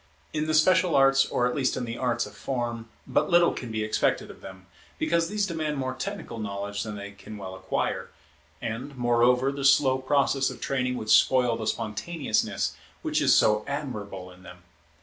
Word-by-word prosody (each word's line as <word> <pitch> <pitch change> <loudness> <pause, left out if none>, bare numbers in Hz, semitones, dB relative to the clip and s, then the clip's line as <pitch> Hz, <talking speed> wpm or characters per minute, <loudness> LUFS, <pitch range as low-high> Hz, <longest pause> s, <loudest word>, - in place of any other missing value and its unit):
In 155 0 -1
the 155 - +1
special 180 +2 +4
arts, 135 0 +5
or 125 - 0
at 125 - 0
least 135 -3 0
in 125 - -2
the 115 0 -5
arts 125 -1 0
of 105 - -11
form, 120 -1 -4 0.2
but - - +1
little 175 -1 +5
can 120 -3 -6
be 110 -1 -1
expected 110 - 0
of - - -16
them, 95 0 -11 0.3
because 170 0 +1
these 210 0 0
demand 155 -5 -2
more 130 -1 -2
technical 200 - -6
knowledge 100 -1 -4
than 105 -1 -5
they 100 0 -7
can 100 +1 -11
well 95 -2 -7
acquire, 95 0 -2 0.5
and, 125 +5 -5
moreover, 125 +2 +3
the 140 0 -5
slow 135 -1 +4
process 135 0 +2
of - - -9
training 125 -2 -1
would 110 -2 -2
spoil 125 -3 +5
the 110 -1 -4
spontaneousness 110 +4 -1 0.3
which - - 0
is - - +5
so 105 0 +4
admirable 105 -10 -5
in 90 0 -16
them. 90 -1 -13
125 Hz, 190 wpm, -26 LUFS, 105-140 Hz, 0.5 s, arts